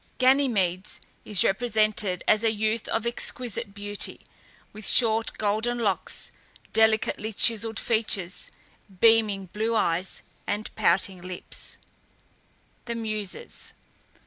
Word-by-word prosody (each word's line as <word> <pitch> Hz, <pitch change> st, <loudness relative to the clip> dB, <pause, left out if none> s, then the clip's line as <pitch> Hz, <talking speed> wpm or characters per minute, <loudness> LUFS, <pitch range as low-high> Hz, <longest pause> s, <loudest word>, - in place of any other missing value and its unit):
Ganymedes 230 Hz, -9 st, +2 dB, 0.3 s
is 205 Hz, -3 st, +4 dB
represented 215 Hz, -3 st, +1 dB
as 215 Hz, +1 st, +4 dB
a 225 Hz, -, +3 dB
youth 220 Hz, +1 st, -1 dB
of 225 Hz, 0 st, -1 dB
exquisite 235 Hz, -3 st, -2 dB
beauty, 205 Hz, 0 st, -4 dB, 0.5 s
with 215 Hz, 0 st, -4 dB
short 225 Hz, -2 st, +5 dB
golden 220 Hz, +3 st, 0 dB
locks, 210 Hz, -5 st, -2 dB, 0.4 s
delicately 220 Hz, 0 st, +2 dB
chiselled 225 Hz, 0 st, +1 dB
features, 200 Hz, -5 st, 0 dB, 0.5 s
beaming 220 Hz, -3 st, +4 dB
blue 220 Hz, +5 st, -2 dB
eyes, 180 Hz, -3 st, -1 dB, 0.2 s
and 210 Hz, +1 st, -3 dB
pouting 185 Hz, +1 st, +1 dB
lips. 180 Hz, 0 st, -7 dB, 1.1 s
THE 235 Hz, -1 st, -4 dB
MUSES. 215 Hz, -, -5 dB
215 Hz, 100 wpm, -26 LUFS, 200-225 Hz, 1.1 s, short